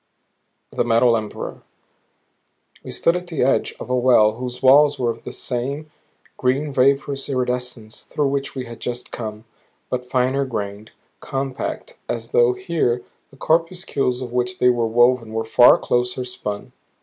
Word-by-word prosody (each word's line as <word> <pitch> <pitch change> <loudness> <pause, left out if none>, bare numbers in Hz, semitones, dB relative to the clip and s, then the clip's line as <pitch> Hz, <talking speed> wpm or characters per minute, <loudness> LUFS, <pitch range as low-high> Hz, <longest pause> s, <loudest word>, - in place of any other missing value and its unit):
THE - - 0
METAL 115 0 +4
EMPEROR 110 -2 -5 1.2
We - - -9
stood 170 - +1
at 180 0 -4
the 160 -7 -1
edge 135 - +1
of - - -7
a - - +3
well 120 -4 +5
whose 125 +2 -7
walls 145 +2 +6
were 120 -3 0
of - - -10
that - - -5
same 140 +5 -4 0.5
green 135 +3 0
vaporous 135 +1 +1
iridescence 125 -4 -3
through 145 -2 -1
which 140 0 -3
we 130 -1 -4
had 115 -1 -10
just 125 0 -5
come, 110 -1 -6 0.5
but 125 0 -3
finer 130 +2 +1
grained, 105 -4 -5 0.3
compact; 135 -1 -4
as 115 -1 -3
though 120 +1 +4
here 155 -9 -1 0.3
the 135 - -19
corpuscles 160 -5 0
of 125 -2 -6
which 125 0 -1
they 125 - +4
were 120 -2 +1
woven 120 0 +3
were 110 0 -1
far 115 +2 +6
closer 125 +1 -1
spun. 105 -4 -6
125 Hz, 155 wpm, -21 LUFS, 120-135 Hz, 1.2 s, walls